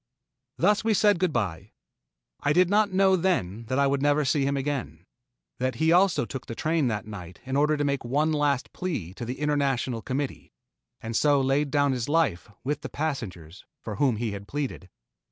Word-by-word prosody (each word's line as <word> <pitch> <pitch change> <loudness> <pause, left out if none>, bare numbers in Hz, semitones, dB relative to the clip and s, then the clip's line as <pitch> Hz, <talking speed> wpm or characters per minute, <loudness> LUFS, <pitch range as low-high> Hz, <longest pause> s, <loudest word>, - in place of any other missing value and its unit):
Thus 205 +5 +3
we 220 -1 +2
said 205 -2 +4
good 185 -2 +1
by. 100 - -3 0.7
I 145 - +1
did 180 +2 +4
not 205 0 +3
know 190 0 +4
then 115 - -1
that 130 +4 -2
I 140 - +4
would 140 0 +1
never 145 +1 +2
see 135 +1 +2
him 140 0 0
again 130 - -3 0.5
that 130 -1 -1
he 160 +6 +2
also 180 +1 +4
took 135 -2 -7
the 115 - -5
train 155 -1 +1
that 105 -3 -2
night 90 -5 -9
in 130 +1 -3
order 150 +2 +3
to 145 - 0
make 140 -1 -1
one 145 +6 +1
last 145 -3 0
plea 130 - -4
to 120 - -6
the 125 +3 -5
International 135 -5 0
Committee, 135 +3 -4 0.5
and 115 0 -5
so 145 +3 +4
laid 135 +2 +1
down 145 -1 +2
his 125 0 -2
life 145 - +1
with 145 +2 -2
the - - -6
passengers 105 - -5 0.2
for 105 -3 -6
whom 130 -2 +2
he 115 0 -2
had 100 0 -7
pleaded. 135 -9 -4
140 Hz, 195 wpm, -26 LUFS, 115-155 Hz, 0.7 s, said